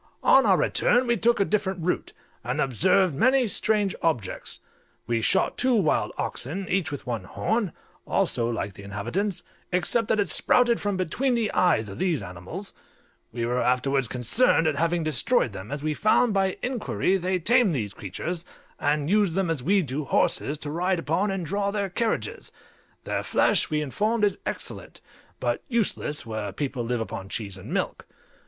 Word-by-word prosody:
On -, -, +6 dB
our -, -, +5 dB
return 245 Hz, +1 st, +2 dB
we 235 Hz, -1 st, +2 dB
took 235 Hz, +2 st, +2 dB
a 200 Hz, -, +3 dB
different 190 Hz, -4 st, -1 dB
route, 180 Hz, -, -1 dB, 0.3 s
and -, -, -2 dB
observed 180 Hz, -, +3 dB
many 255 Hz, -, +3 dB
strange 210 Hz, -1 st, +1 dB
objects. 125 Hz, -, -2 dB, 0.5 s
We 115 Hz, 0 st, 0 dB
shot 105 Hz, -, +1 dB
two 255 Hz, -1 st, +3 dB
wild 190 Hz, -9 st, +2 dB
oxen, 165 Hz, +11 st, -3 dB
each 185 Hz, -4 st, +1 dB
with 145 Hz, -, -6 dB
one 115 Hz, -6 st, -3 dB
horn, 215 Hz, -, -1 dB, 0.4 s
also 115 Hz, 0 st, +1 dB
like 105 Hz, -4 st, -3 dB
the 100 Hz, -, -12 dB
inhabitants, 130 Hz, -, -3 dB, 0.3 s
except 205 Hz, +5 st, +1 dB
that 215 Hz, -, +1 dB
it 205 Hz, -, +2 dB
sprouted 240 Hz, -2 st, +3 dB
from 205 Hz, -2 st, -1 dB
between 240 Hz, +9 st, 0 dB
the 225 Hz, -3 st, 0 dB
eyes 155 Hz, -12 st, +2 dB
of 100 Hz, 0 st, -8 dB
these 170 Hz, -, 0 dB
animals; 95 Hz, -, -7 dB, 0.6 s
we 115 Hz, 0 st, -2 dB
were 125 Hz, +1 st, 0 dB
afterwards 125 Hz, +2 st, +1 dB
concerned 145 Hz, -, +2 dB
at 155 Hz, -2 st, +2 dB
having 170 Hz, +3 st, +1 dB
destroyed 155 Hz, -, +1 dB
them, 95 Hz, +5 st, -8 dB
as 145 Hz, 0 st, -4 dB
we 155 Hz, 0 st, 0 dB
found, 215 Hz, +6 st, +3 dB
by 195 Hz, -1 st, +1 dB
inquiry, 245 Hz, -6 st, 0 dB
they 185 Hz, +1 st, 0 dB
tamed 215 Hz, 0 st, +3 dB
these 105 Hz, -6 st, -3 dB
creatures, 165 Hz, -, -5 dB, 0.4 s
and 145 Hz, 0 st, +1 dB
used 200 Hz, -2 st, +2 dB
them 190 Hz, -3 st, +1 dB
as 155 Hz, -6 st, -2 dB
we 195 Hz, +7 st, +3 dB
do 140 Hz, +1 st, -3 dB
horses, 145 Hz, +2 st, +1 dB
to 145 Hz, 0 st, -6 dB
ride 180 Hz, +3 st, 0 dB
upon 165 Hz, +5 st, 0 dB
and 195 Hz, -3 st, -2 dB
draw 200 Hz, +4 st, -1 dB
their 200 Hz, -2 st, -2 dB
carriages; 225 Hz, +4 st, -2 dB, 0.5 s
their -, -, -2 dB
flesh, -, -, +2 dB
we 155 Hz, -, 0 dB
were 150 Hz, -, 0 dB
informed, 210 Hz, -, 0 dB
is 205 Hz, -, -1 dB
excellent, -, -, -5 dB, 0.4 s
but -, -, -1 dB
useless 215 Hz, -, -1 dB
where 110 Hz, -3 st, -4 dB
people 130 Hz, +3 st, -3 dB
live 120 Hz, 0 st, -1 dB
upon 95 Hz, -3 st, -6 dB
cheese 100 Hz, -2 st, -4 dB
and 95 Hz, -, -10 dB
milk. -, -, -2 dB
170 Hz, 175 wpm, -26 LUFS, 125-205 Hz, 0.6 s, On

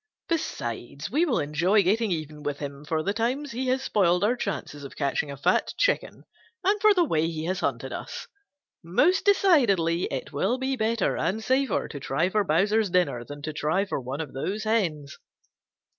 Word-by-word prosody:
Besides, 140 Hz, -, -3 dB
we 310 Hz, +7 st, +3 dB
will 280 Hz, -8 st, +1 dB
enjoy 170 Hz, +8 st, +2 dB
getting 215 Hz, +4 st, +2 dB
even 155 Hz, -3 st, -4 dB
with 145 Hz, -1 st, -3 dB
him 140 Hz, 0 st, -7 dB
for 155 Hz, +1 st, -1 dB
the 200 Hz, -, 0 dB
times 255 Hz, +6 st, -1 dB
he 255 Hz, +2 st, -3 dB
has 260 Hz, +1 st, +1 dB
spoiled 180 Hz, -6 st, +2 dB
our 225 Hz, +4 st, +3 dB
chances 145 Hz, -, -4 dB
of 140 Hz, -, -9 dB
catching 140 Hz, 0 st, -1 dB
a 140 Hz, -, -6 dB
fat 140 Hz, -, +1 dB
chicken -, -, 0 dB, 0.4 s
and 400 Hz, +2 st, +2 dB
for 425 Hz, -1 st, +6 dB
the 355 Hz, -, +4 dB
way 165 Hz, -, +1 dB
he 160 Hz, -1 st, -4 dB
has 185 Hz, +2 st, -1 dB
hunted -, -, -2 dB
us. -, -, -6 dB, 0.6 s
Most 290 Hz, -, +2 dB
decidedly 235 Hz, -, +3 dB
it 135 Hz, +3 st, -5 dB
will 195 Hz, -, +1 dB
be 265 Hz, +1 st, -1 dB
better 225 Hz, -3 st, 0 dB
and 220 Hz, +3 st, -1 dB
safer 265 Hz, +2 st, +1 dB
to 145 Hz, -, -7 dB
try 140 Hz, +6 st, 0 dB
for 210 Hz, +1 st, +1 dB
Bowser's 200 Hz, +5 st, +2 dB
dinner 175 Hz, -9 st, +1 dB
than 145 Hz, +3 st, -10 dB
to 155 Hz, 0 st, -4 dB
try 155 Hz, +7 st, 0 dB
for 190 Hz, -, -3 dB
one 130 Hz, +5 st, -4 dB
of 150 Hz, -4 st, -7 dB
those 195 Hz, +11 st, -3 dB
hens." 170 Hz, -11 st, -1 dB
185 Hz, 190 wpm, -26 LUFS, 150-235 Hz, 0.6 s, for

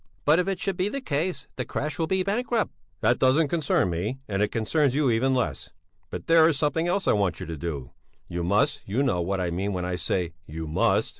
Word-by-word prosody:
"But 150 Hz, +4 st, +5 dB
if 180 Hz, -, 0 dB
it 195 Hz, -2 st, -1 dB
should 195 Hz, -2 st, -2 dB
be 185 Hz, +3 st, +1 dB
the 275 Hz, -, -3 dB
case, 155 Hz, -, -2 dB
the 125 Hz, -, -1 dB
crèche 150 Hz, +7 st, -3 dB
will 160 Hz, -, +1 dB
be 190 Hz, +1 st, +1 dB
bankrupt." 225 Hz, +3 st, 0 dB, 0.3 s
"That 120 Hz, -, +3 dB
doesn't 140 Hz, +4 st, +4 dB
concern 140 Hz, -, +1 dB
me, 100 Hz, +10 st, -2 dB
and 100 Hz, -1 st, -1 dB
it 105 Hz, -, +3 dB
concerns 130 Hz, +6 st, +1 dB
you 145 Hz, -4 st, +3 dB
even 130 Hz, +4 st, +2 dB
less. 125 Hz, -, -2 dB, 0.4 s
But -, -, -6 dB
there 165 Hz, -1 st, +6 dB
is 155 Hz, -, 0 dB
something 160 Hz, +3 st, +1 dB
else 190 Hz, +2 st, 0 dB
I -, -, +5 dB
want 100 Hz, -5 st, 0 dB
you 95 Hz, -, -5 dB
to 85 Hz, -1 st, -5 dB
do. 75 Hz, -5 st, -5 dB, 0.4 s
You 85 Hz, 0 st, -3 dB
must 105 Hz, -, +2 dB
you 115 Hz, +8 st, +1 dB
know 90 Hz, -10 st, +1 dB
what 95 Hz, +3 st, -1 dB
I 90 Hz, -2 st, -1 dB
mean 95 Hz, +4 st, -2 dB
when 90 Hz, -1 st, -2 dB
I 90 Hz, 0 st, -2 dB
say 85 Hz, 0 st, -1 dB
you 80 Hz, +1 st, -5 dB
must...." 75 Hz, -, +2 dB
130 Hz, 235 wpm, -26 LUFS, -, 0.4 s, there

